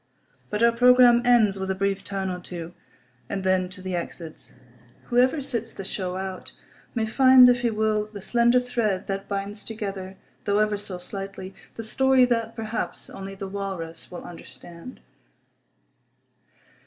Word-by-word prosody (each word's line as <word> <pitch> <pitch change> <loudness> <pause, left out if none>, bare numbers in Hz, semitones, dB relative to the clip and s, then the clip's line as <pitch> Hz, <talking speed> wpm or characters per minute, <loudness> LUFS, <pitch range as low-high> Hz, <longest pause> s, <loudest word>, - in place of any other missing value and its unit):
But 210 +2 -1
our 235 - +6
programme 245 0 +6
ends 225 -5 +4
with 190 0 -3
a 190 - 0
brief 195 0 -1
"turn" 195 -1 -3
or 180 - -4
two; 175 -1 -8 0.6
and 195 -1 -3
then 185 -1 +1
to 185 0 -12
the 185 -1 -3
exits. 170 -2 -7 0.5
Whoever 255 +5 +2
sits 235 -4 -4
the 195 - -6
show 185 -2 -3
out 190 0 -6 0.4
may 225 -2 +1
find, 255 +2 +7
if 245 -1 +3
he 240 - +2
will, 215 -1 0
the 210 -1 -9
slender 240 +4 +3
thread 230 -6 -1
that 195 0 -4
binds 200 +1 -4
together, 195 -4 -6 0.3
though 205 0 +2
ever 215 0 +2
so 200 -2 -6
slightly, 195 +1 -7 0.2
the 225 - -6
story 265 +3 +4
that, 230 -2 -1
perhaps, 220 -6 -4
only 195 0 -8
the 195 0 -6
Walrus 190 -4 -5
will 180 - -8
understand. 175 +4 -11
200 Hz, 155 wpm, -25 LUFS, 190-235 Hz, 0.6 s, find